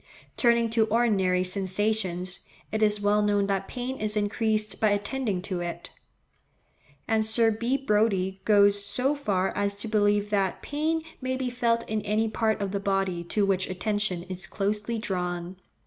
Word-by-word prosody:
Turning 235 -1 +3
to 225 0 +2
ordinary 200 -6 +2
sensations, 185 -1 -1 0.3
it 220 - -1
is 210 -1 +3
well 205 +1 +3
known 205 -1 +2
that 195 -1 -1
pain 255 +1 -4
is 215 -2 -1
increased 215 0 0
by 215 - +3
attending 205 -1 -1
to 190 -3 -3
it; 175 -1 -6 1.2
and 220 -1 +2
Sir 225 +1 +4
B. 235 +5 0
Brodie 210 -6 +1
goes 205 -1 +4
so 250 +8 0
far 200 -10 -1
as 200 0 -1
to 225 - -4
believe 205 -1 +2
that 195 -3 0
pain 315 +2 -1 0.2
may 260 0 -1
be 255 -1 -2
felt 235 -1 0
in 215 0 -1
any 215 +2 0
part 220 0 0
of 195 - -3
the 200 - -1
body 195 -3 -1
to 205 +3 +1
which 190 -1 0
attention 190 -1 -1
is 185 -1 -7
closely 210 +3 -2
drawn. 180 -4 -3
210 Hz, 165 wpm, -27 LUFS, 195-225 Hz, 1.2 s, Sir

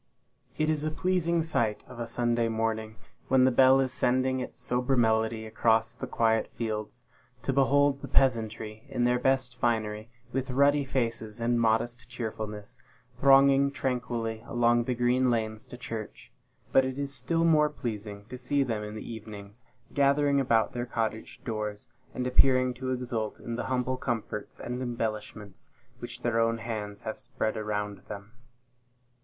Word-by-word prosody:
It 155 - +1
is 155 -1 +1
a 155 - 0
pleasing 170 0 +1
sight, 115 -9 0
of 125 -1 -11
a 120 - -3
Sunday 120 0 +1
morning, 110 -1 -2 0.3
when 130 -1 +5
the 130 - +5
bell 130 +1 +6
is 130 -1 0
sending 130 -1 +1
its 125 - -6
sober 125 +1 0
melody 110 -1 +2
across 110 0 +2
the 130 +2 -6
quiet 110 -2 +2
fields, 110 +1 -4 0.4
to 135 - 0
behold 140 +1 +3
the 140 - -6
peasantry 110 -4 +1
in 120 - -1
their 125 0 +3
best 130 -1 +1
finery, 110 -2 -1 0.2
with 135 +1 -2
ruddy 140 +2 +4
faces, 115 -4 -2
and 120 0 +1
modest 115 +2 0
cheerfulness, 110 -3 -6 0.4
thronging 140 0 +6
tranquilly 120 -4 -2
along 120 0 +2
the 125 - -1
green 125 +1 +2
lanes 110 -2 -1
to 125 - -9
church; 115 -3 -7 0.4
but 135 - +6
it 130 0 -3
is 140 -1 -3
still 165 +4 0
more 155 -2 +5
pleasing 105 -7 -6
to 125 +3 -9
see 140 +3 +1
them 115 -5 -2
in 105 0 -6
the 110 - -7
evenings, 105 0 -9 0.3
gathering 140 0 +3
about 115 -2 +2
their 120 0 -3
cottage 110 -2 -3
doors, 105 -4 -4 0.3
and 125 - -2
appearing 130 0 +4
to 130 +1 -5
exult 120 -4 -3
in 115 - -5
the - - -3
humble 130 0 -1
comforts 115 -4 -4
and 125 +1 -4
embellishments 110 -4 -4 0.3
which - - -8
their 120 -1 +1
own 115 0 +2
hands 105 -3 -5
have 110 -1 -5
spread 110 - -2
around 105 -1 -3
them. 100 0 -8
120 Hz, 160 wpm, -28 LUFS, 110-130 Hz, 0.4 s, bell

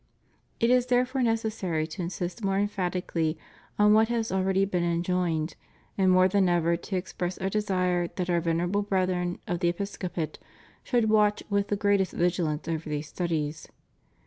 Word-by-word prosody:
It 230 +1 +3
is 250 0 +3
therefore 255 +1 +1
necessary 220 -8 0
to 160 +3 -7
insist 180 +4 -4
more 195 0 +1
emphatically 180 -5 -1 0.4
on 210 0 +5
what 220 +1 +5
has 230 -1 -1
already 190 +1 +2
been 185 -3 -1
enjoined 170 -2 0 0.4
and 190 -1 +3
more 185 0 +6
than 190 -1 +2
ever 170 -1 +2
to 185 +3 -5
express 180 0 -3
Our 190 - -2
desire 185 -4 0
that 180 +1 -4
Our 175 -1 +1
Vener 165 0 0
able 200 +4 0
Brethren 185 -3 0
of 175 -1 -2
the 175 -1 +2
episcopate 175 -3 -4 0.4
should 235 -4 +1
watch 210 -1 +3
with 200 0 +1
the 205 - 0
greatest 200 -2 +1
vigilance 170 -3 0
over 165 -1 -3
these 150 0 -3
studies. 155 -3 -2
185 Hz, 165 wpm, -27 LUFS, 170-205 Hz, 0.4 s, more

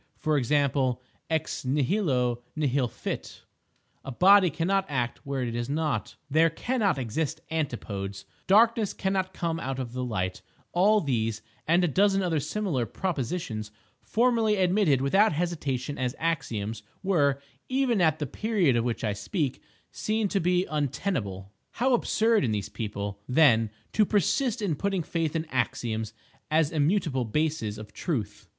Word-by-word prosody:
For 155 -1 0
example—"Ex 140 +2 0
nihilo 130 - +1
nihil 140 -4 +1
fit"; - - -6 0.6
"a 135 - -6
body 190 +6 +6
cannot 190 +5 0
act 120 -4 -2
where 135 -2 -1
it 120 -2 -3
is 120 +1 -3
not"; 145 -7 -1
"there 160 +3 +4
cannot 205 - 0
exist 135 +6 -2
antipodes"; 105 -10 -3 0.2
"darkness 220 +1 +4
cannot 190 -1 -1
come 165 -3 -2
out 135 -4 -3
of 125 -2 -5
light"—all 125 - 0
these, 115 -6 -1 0.2
and 170 +3 +4
a - - +3
dozen 195 +4 +3
other 165 -4 +1
similar 150 - -1
propositions, 135 - -3 0.3
formerly 230 -2 +2
admitted 185 -7 +3
without 195 +9 +4
hesitation 145 -5 -2
as 125 -1 -1
axioms, 115 -10 -2 0.2
were, 145 -8 +2 0.3
even 255 -5 +2
at 160 -3 +3
the 150 - -2
period 190 - +1
of 115 - +2
which 120 -1 -2
I 105 -2 0
speak, 140 - -2 0.3
seen 215 0 -1
to 195 - +1
be 180 +1 +2
untenable. 135 - -3 0.2
How 255 +3 +2
absurd 225 -3 +2
in 120 - +1
these 105 -2 -2
people, 100 -2 -5
then, 125 -6 +5 0.2
to 215 - +4
persist 225 - +1
in 185 -6 +1
putting 195 +2 -1
faith 165 -1 -2
in 160 0 -1
"axioms" 110 -3 -1 0.4
as 155 -1 +2
immutable 155 -3 +1
bases 120 -4 -1
of 105 -1 -10
Truth! 105 - -3
150 Hz, 140 wpm, -27 LUFS, 120-190 Hz, 0.6 s, body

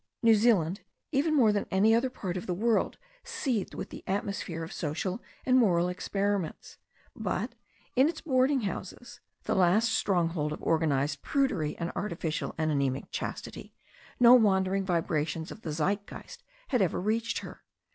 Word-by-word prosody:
New 230 -1 +7
Zealand, 205 -5 +3 0.3
even 305 +2 +2
more 235 -7 +5
than 205 -1 -1
any 205 +4 +4
other 240 +3 +2
part 185 -7 -5
of 180 - -5
the 180 - -1
world, 225 +4 +1 0.3
seethed 270 - -2
with - - -6
the - - -9
atmosphere 195 -4 -3
of 165 - -7
social 175 - -3 0.2
and 255 0 +5
moral 180 -6 +3
ex 180 - -6
periments. 200 -4 -2 0.4
But, - - -2 0.4
in 265 +4 +5
its 325 - -5
boarding 265 -2 +2
houses, 230 +5 -6 0.2
the - - -1
last 190 +5 +3
stronghold 165 -7 0
of - - -9
organized 145 -3 +1
prudery 205 - 0
and 170 0 -3
artificial 170 -5 -3
and 155 -1 0
anaemic 140 -2 -1
chastity, - - -6 0.4
no 245 0 +8
wandering 195 -4 +3
vibrations 165 -2 -1
of 220 - -10
the 165 - -5
Zeitgeist 200 - -3 0.3
had 250 -5 +2
ever 185 - +1
reached 220 +4 -1
her. - - -11
195 Hz, 155 wpm, -29 LUFS, 165-235 Hz, 0.4 s, no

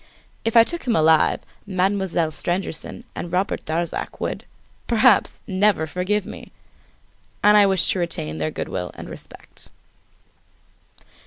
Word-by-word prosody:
If 225 +1 +1
I 230 - +10
took 340 +2 -4
him 235 - +2
alive, 160 0 +4 0.3
Mademoiselle 190 -3 0
Stangerson 175 +1 -3
and 170 - -6
Robert 185 +3 -1
Darzac 165 +2 -3
would, - - -4 0.4
perhaps, 235 -2 +3
never 190 -3 +2
forgive 185 +5 -1
me! - - -10 0.9
And 210 0 +6
I 205 -1 +7
wish 190 -3 +2
to 190 - -1
retain 80 - -3
their 80 0 -1
good - - -5
will 90 -1 -4
and - - -9
respect. - - -12
185 Hz, 135 wpm, -22 LUFS, 160-210 Hz, 0.9 s, I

